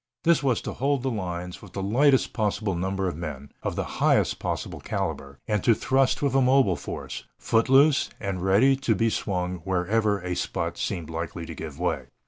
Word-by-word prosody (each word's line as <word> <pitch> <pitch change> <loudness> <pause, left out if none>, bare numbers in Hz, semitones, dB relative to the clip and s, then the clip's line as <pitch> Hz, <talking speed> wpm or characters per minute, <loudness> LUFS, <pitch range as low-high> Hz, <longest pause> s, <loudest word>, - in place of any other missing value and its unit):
This 170 -1 +4
was 130 -4 +1
to - - -4
hold 140 -1 0
the 135 - 0
lines 90 -4 -4
with 95 -4 -13
the 95 - -3
lightest 130 +6 +3
possible 105 -2 0
number 95 +2 -1
of 85 - -3
men, 75 -4 -6
of - - -3
the - - -1 0.2
highest - - +3
possible - - -3
caliber, 70 0 -4
and 105 -3 0
to 115 - +5
thrust 135 +4 +1
with 140 -3 +1
a 135 - +4
mobile 130 -7 +4
force, 60 -6 -6
foot 115 +2 +1
loose 140 +2 +5
and 95 -2 -3
ready 100 +9 +4
to 135 -5 +1
be 115 +3 +1
swung 90 -3 -2
wherever 100 +4 0
a 90 0 -3
spot - - -3
seemed 80 -2 -3
likely 85 +1 -4
to 80 - -7
give 75 -3 -7
way. 80 -8 -1
100 Hz, 195 wpm, -26 LUFS, 90-125 Hz, 0.2 s, to